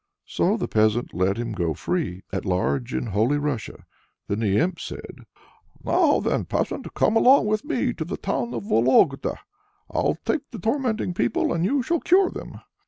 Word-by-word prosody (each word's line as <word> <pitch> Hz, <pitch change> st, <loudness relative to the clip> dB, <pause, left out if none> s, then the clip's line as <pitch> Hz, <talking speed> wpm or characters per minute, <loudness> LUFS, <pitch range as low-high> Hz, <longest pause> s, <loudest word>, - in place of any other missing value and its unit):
So -, -, +1 dB
the -, -, -2 dB
peasant 110 Hz, +2 st, +1 dB
let 95 Hz, +3 st, +1 dB
him 120 Hz, -1 st, -3 dB
go 85 Hz, -6 st, -1 dB
free 155 Hz, -, -3 dB
at 95 Hz, -, -2 dB
large 70 Hz, -10 st, -1 dB
in 65 Hz, 0 st, -2 dB
Holy 110 Hz, +9 st, +1 dB
Russia. 145 Hz, -6 st, -4 dB, 0.4 s
Then 100 Hz, -, -2 dB
the 105 Hz, -3 st, +1 dB
imp 170 Hz, +1 st, 0 dB
said: -, -, -9 dB, 0.6 s
"Now -, -, +3 dB
then, -, -, -1 dB
peasant, -, -, -2 dB
come 220 Hz, -, +2 dB
along 255 Hz, +2 st, +6 dB
with 215 Hz, +2 st, 0 dB
me 265 Hz, -5 st, -1 dB
to 160 Hz, -, -4 dB
the 165 Hz, -, -5 dB
town 120 Hz, +1 st, -2 dB
of 115 Hz, -, -4 dB
Vologda. 130 Hz, +6 st, +3 dB, 0.5 s
I'll -, -, 0 dB
take 295 Hz, -3 st, -1 dB
to 235 Hz, -, -8 dB
tormenting 225 Hz, -5 st, -1 dB
people, 120 Hz, -8 st, 0 dB
and 170 Hz, 0 st, -1 dB
you 265 Hz, +7 st, +1 dB
shall 335 Hz, +6 st, 0 dB
cure 370 Hz, +1 st, +3 dB
them." -, -, -9 dB
135 Hz, 175 wpm, -24 LUFS, -, 0.6 s, along